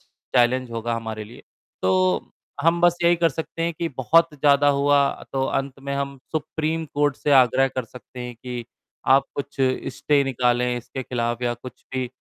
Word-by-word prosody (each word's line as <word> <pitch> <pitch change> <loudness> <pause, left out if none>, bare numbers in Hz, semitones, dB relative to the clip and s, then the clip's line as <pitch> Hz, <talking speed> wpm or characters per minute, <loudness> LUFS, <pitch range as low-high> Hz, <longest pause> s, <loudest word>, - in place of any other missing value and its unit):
Challenge 125 0 0
होगा 115 0 -2
हमारे 110 -2 -5
लिए। 115 +4 -13 0.4
तो 95 -1 +2 0.3
हम 165 +2 +3
बस 175 0 +4
यही 170 0 +5
कर 165 0 +3
सकते 160 +2 -5
हैं 170 0 0
कि 165 +2 -2
बहुत 165 +7 +4
ज़्यादा 145 0 +4
हुआ 140 0 +4 0.3
तो 135 0 0
अंत 135 0 -2
में 140 0 -4
हम 140 0 -3
सुप्रीम 160 +1 -2
कोर्ट 145 -1 +2
से 150 - -2
आग्रह 130 0 +5
कर 130 -1 -4
सकते 125 +2 -12
हैं 125 0 -6
कि 120 0 -6 0.5
आप 135 0 +4
कुछ 140 0 -5 0.4
स्टे 145 -1 +2
निकालें 125 -1 +1
इसके 120 +2 -6
खिलाफ 120 -1 -2
या 120 -1 +1
कुछ 125 +2 -12
भी 130 -1 -2
135 Hz, 175 wpm, -23 LUFS, 120-145 Hz, 0.5 s, यही